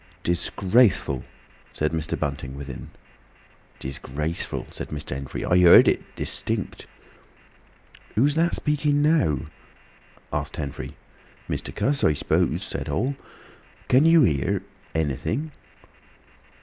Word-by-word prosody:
"Disgraceful!" 90 Hz, -, +2 dB, 0.5 s
said 75 Hz, 0 st, 0 dB
Mr. 80 Hz, -1 st, -2 dB
Bunting, 70 Hz, -2 st, -3 dB
within. 70 Hz, -2 st, -8 dB, 0.9 s
"'Disgraceful,'" 70 Hz, +4 st, -3 dB
said -, -, -7 dB
Mr. 75 Hz, -1 st, -6 dB
Henfrey. 65 Hz, 0 st, -4 dB
"I 90 Hz, -, +4 dB
heard 90 Hz, -1 st, +8 dB
it—distinct." -, -, -2 dB, 1.3 s
"Who's 140 Hz, +7 st, +4 dB
that 165 Hz, +3 st, +2 dB
speaking 150 Hz, -1 st, +1 dB
now?" 150 Hz, -, +3 dB, 0.9 s
asked -, -, -2 dB
Henfrey. 70 Hz, -3 st, -6 dB, 0.5 s
"Mr. -, -, -4 dB
Cuss, 140 Hz, 0 st, 0 dB
I 75 Hz, -, +5 dB
s'pose," -, -, 0 dB
said -, -, -4 dB
Hall. 130 Hz, +6 st, -1 dB, 0.7 s
"Can 130 Hz, +3 st, +6 dB
you 165 Hz, -1 st, +7 dB
hear—anything?" 80 Hz, -, -1 dB
85 Hz, 95 wpm, -24 LUFS, -, 1.3 s, heard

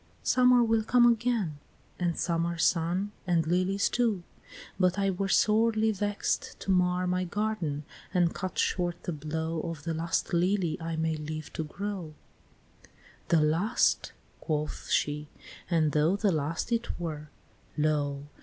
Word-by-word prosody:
Summer 250 Hz, -1 st, +5 dB
will 225 Hz, -1 st, +2 dB
come 240 Hz, +2 st, +4 dB
again, 230 Hz, -9 st, +1 dB, 0.4 s
and 175 Hz, -2 st, 0 dB
summer 170 Hz, 0 st, 0 dB
sun, 175 Hz, +5 st, +1 dB, 0.2 s
And 170 Hz, -3 st, +2 dB
lilies 185 Hz, +4 st, +1 dB
too, 225 Hz, -7 st, 0 dB, 0.6 s
but 185 Hz, 0 st, +3 dB
I 195 Hz, -1 st, +2 dB
were 195 Hz, +1 st, -2 dB
sorely 220 Hz, +1 st, +3 dB
vext 205 Hz, 0 st, -2 dB
To 195 Hz, -, -1 dB
mar 180 Hz, 0 st, +2 dB
my 180 Hz, 0 st, 0 dB
garden, 180 Hz, -6 st, -2 dB, 0.3 s
and 175 Hz, -2 st, +2 dB
cut 185 Hz, -1 st, -5 dB
short 175 Hz, -2 st, 0 dB
the -, -, -3 dB
blow 160 Hz, +1 st, -3 dB
Of 165 Hz, -3 st, -6 dB
the 165 Hz, 0 st, -2 dB
last 165 Hz, +2 st, -1 dB
lily 175 Hz, -1 st, +2 dB
I 165 Hz, 0 st, -3 dB
may 160 Hz, 0 st, 0 dB
live 155 Hz, 0 st, -6 dB
to 160 Hz, -, -2 dB
grow," 180 Hz, -1 st, -5 dB, 0.7 s
IX. -, -, -21 dB, 0.4 s
"The 165 Hz, -2 st, +4 dB
last!" 165 Hz, +10 st, +2 dB, 0.3 s
quoth 150 Hz, -2 st, -3 dB
she, 150 Hz, 0 st, 0 dB, 0.4 s
"and 160 Hz, -4 st, +2 dB
though 155 Hz, +5 st, +3 dB
the 205 Hz, -1 st, +2 dB
last 155 Hz, +6 st, -2 dB
it 235 Hz, -4 st, -1 dB
were 155 Hz, -3 st, -5 dB, 0.5 s
Lo! 145 Hz, -2 st, 0 dB
175 Hz, 145 wpm, -29 LUFS, 160-200 Hz, 0.7 s, Summer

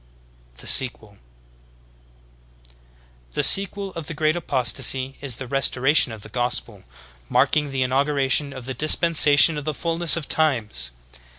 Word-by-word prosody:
"* -, -, -33 dB
THE -, -, -12 dB
SEQUEL. 120 Hz, -4 st, +2 dB
32. 100 Hz, -, -24 dB, 2.1 s
The -, -, -2 dB
sequel 195 Hz, 0 st, +2 dB
of 165 Hz, -3 st, -8 dB
the 165 Hz, -, -8 dB
Great 155 Hz, +1 st, -1 dB
Apostasy 130 Hz, -3 st, -1 dB
is 135 Hz, -5 st, -4 dB
the 135 Hz, -, -8 dB
Restoration 135 Hz, +1 st, +1 dB
of 110 Hz, -2 st, -11 dB
the -, -, -12 dB
Gospel, 120 Hz, -3 st, -4 dB, 0.4 s
marking 145 Hz, +3 st, 0 dB
the 135 Hz, -1 st, -3 dB
inauguration 140 Hz, +1 st, -1 dB
of 130 Hz, -3 st, -11 dB
the 130 Hz, -, -6 dB
Dispensation 155 Hz, +1 st, +4 dB
of -, -, -10 dB
the 155 Hz, 0 st, -5 dB
Fulness 170 Hz, +1 st, +3 dB
of 160 Hz, -, -7 dB
Times. 120 Hz, -, +1 dB
135 Hz, 140 wpm, -20 LUFS, 125-155 Hz, 2.1 s, Dispensation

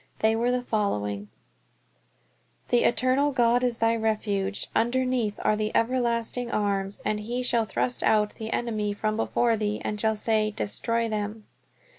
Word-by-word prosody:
They 220 Hz, 0 st, +3 dB
were 235 Hz, +2 st, +1 dB
the 250 Hz, 0 st, 0 dB
following: 105 Hz, -, -2 dB, 1.4 s
"The 245 Hz, -, +3 dB
eternal 255 Hz, +4 st, +2 dB
God 245 Hz, -1 st, +3 dB
is 245 Hz, -2 st, +1 dB
thy 225 Hz, 0 st, +2 dB
refuge, 210 Hz, -3 st, -1 dB
and 230 Hz, -, +3 dB
underneath 250 Hz, -4 st, 0 dB
are 215 Hz, -, +3 dB
the 215 Hz, 0 st, -1 dB
everlasting 235 Hz, 0 st, 0 dB
arms: 200 Hz, -2 st, -1 dB
and 210 Hz, -, 0 dB
he 240 Hz, +4 st, -3 dB
shall 235 Hz, -2 st, +2 dB
thrust 125 Hz, -, -1 dB
out 210 Hz, -1 st, +2 dB
the 220 Hz, 0 st, -5 dB
enemy 215 Hz, -3 st, -1 dB
from 215 Hz, +1 st, -1 dB
before 230 Hz, +1 st, +1 dB
thee; 210 Hz, -1 st, -2 dB
and 210 Hz, 0 st, -2 dB
shall 220 Hz, -1 st, +2 dB
say, 215 Hz, 0 st, +1 dB
Destroy 230 Hz, +2 st, -1 dB
them." 210 Hz, 0 st, -4 dB
220 Hz, 155 wpm, -26 LUFS, 210-235 Hz, 1.4 s, They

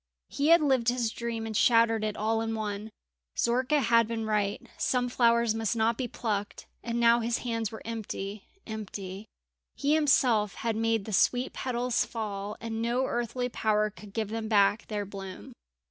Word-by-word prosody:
He 285 Hz, -, 0 dB
had 335 Hz, +1 st, +7 dB
lived 260 Hz, -5 st, +3 dB
his 240 Hz, -2 st, 0 dB
dream 230 Hz, -1 st, -4 dB
and 220 Hz, -1 st, -5 dB
shattered 230 Hz, -1 st, +4 dB
it 215 Hz, -1 st, -2 dB
all 225 Hz, +1 st, 0 dB
in 225 Hz, 0 st, -2 dB
one. 210 Hz, 0 st, -4 dB, 0.5 s
Zorka 255 Hz, +5 st, +2 dB
had 230 Hz, -3 st, +4 dB
been 225 Hz, -1 st, -3 dB
right, 210 Hz, -2 st, -1 dB
some 245 Hz, -1 st, 0 dB
flowers 235 Hz, -2 st, +3 dB
must 225 Hz, 0 st, -1 dB
not 225 Hz, +1 st, +2 dB
be 250 Hz, +1 st, -3 dB
plucked; 210 Hz, -4 st, -3 dB, 0.2 s
and 235 Hz, 0 st, -2 dB
now 235 Hz, 0 st, +5 dB
his 235 Hz, +1 st, 0 dB
hands 230 Hz, -3 st, -1 dB
were 220 Hz, -, -9 dB
empty 210 Hz, -3 st, -5 dB, 0.2 s
empty. 205 Hz, -2 st, -6 dB, 0.5 s
He 285 Hz, +1 st, +1 dB
himself 255 Hz, -9 st, +3 dB
had 230 Hz, -2 st, -2 dB
made 225 Hz, -2 st, 0 dB
the 215 Hz, -, -5 dB
sweet 250 Hz, +6 st, +2 dB
petals 250 Hz, -1 st, 0 dB
fall, 210 Hz, -2 st, -5 dB
and 225 Hz, -1 st, -4 dB
no 240 Hz, +3 st, +1 dB
earthly 240 Hz, +1 st, -2 dB
power 215 Hz, -3 st, +1 dB
could 210 Hz, 0 st, -13 dB
give 215 Hz, 0 st, -2 dB
them 225 Hz, 0 st, -3 dB
back 210 Hz, 0 st, +3 dB
their 205 Hz, -2 st, -3 dB
bloom. 195 Hz, -1 st, -9 dB
225 Hz, 175 wpm, -29 LUFS, 215-240 Hz, 0.5 s, had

